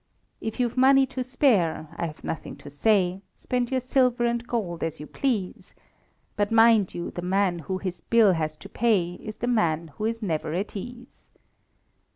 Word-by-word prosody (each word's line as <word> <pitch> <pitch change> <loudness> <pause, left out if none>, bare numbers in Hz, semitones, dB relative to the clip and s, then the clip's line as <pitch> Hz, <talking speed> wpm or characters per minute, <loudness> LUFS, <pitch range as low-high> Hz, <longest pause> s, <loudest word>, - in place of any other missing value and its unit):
If 220 +3 -5
you've 245 0 0
money 270 +1 +6
to 260 -1 -4
spare, 215 - +1
I 170 - -2
have 150 - -11
nothing 160 - -5
to 145 - -12
say 185 +3 +2
Spend 250 -1 -2
your 260 -1 0
silver 250 -1 +2
and 235 0 -1
gold 185 -9 -3
as 160 -1 -3
you 150 - -7
please; 215 - -3 0.6
But 205 0 0
mind 225 -3 +5
you, 175 - -4
the 175 - -6
man 185 -1 +1
who 185 +4 -3
his 185 -2 -5
bill 225 -5 +5
has 155 -2 -2
to 200 - -11
pay 200 -5 +1
Is 215 -1 -7
the - - -3
man 170 -9 +1
who 215 - -2
is 225 0 -2
never 160 -4 -2
at 195 +4 -3
ease. 245 +5 -9
210 Hz, 185 wpm, -26 LUFS, 175-240 Hz, 0.6 s, money